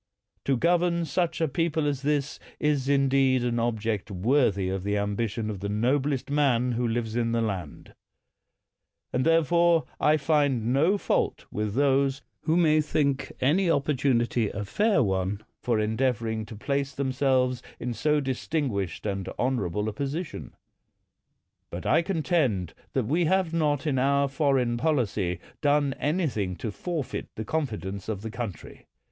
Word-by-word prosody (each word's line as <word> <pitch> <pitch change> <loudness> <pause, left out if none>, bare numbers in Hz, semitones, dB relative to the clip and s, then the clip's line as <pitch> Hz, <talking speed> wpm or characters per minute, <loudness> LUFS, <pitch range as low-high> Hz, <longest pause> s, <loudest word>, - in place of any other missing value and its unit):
To 135 -2 +2
govern 170 +2 +2
such 165 +3 -1
a 160 - +3
people 160 +1 0
as 140 -2 -1
this 145 0 -1 0.2
is 145 -3 +1
indeed 135 -2 +3
an 120 -1 0
object 110 -3 -1
worthy 105 0 +2
of 95 0 -2
the 100 +1 0
ambition 105 +2 -2
of 105 -3 -4
the 100 +1 -4
noblest 130 +6 0
man 130 -4 +2
who 120 0 0
lives 115 -1 -2
in 115 -1 0
the 115 - +1
land; 95 -8 -5 1.2
and 125 - +1
therefore 165 +1 +3
I 155 +1 +4
find 140 -6 +1
no 165 +9 +3
fault - - -1
with 105 0 -2
those 140 0 +2 0.2
who 160 +1 +2
may 155 -3 +4
198 - - +4
PALMERSTON 140 -2 -1
think - - -5
any 180 +5 +3
opportunity 130 -6 +1
a 105 +1 -5
fair 205 - +2
one 95 +1 -1 0.2
for 115 -3 +1
endeavor 115 +2 0
ing 110 -1 -3
to 110 - -9
place 140 +4 -2
themselves 130 -2 +1 0.2
in 125 0 -3
so 150 +7 +1
distinguished 130 - -2
and 100 -2 -2
honorable 105 -6 -1
a 110 - -2
position. 140 - -5 1.1
But 85 - -7
I 160 - +4
contend 155 - 0 0.2
that 130 -4 0
we 165 +8 +1
have 185 0 +1
not 150 -3 +1
in 140 -4 +1
our 140 +1 +3
foreign 135 -4 +1
policy 110 - 0 0.2
done 145 -1 +2
anything 140 - -1
to 110 +4 -4
forfeit 160 - -4
the 110 - -5
confidence 105 -10 -3
of 105 -2 -3
the 110 - -5
country. 110 -7 -7
130 Hz, 155 wpm, -27 LUFS, 110-150 Hz, 1.2 s, I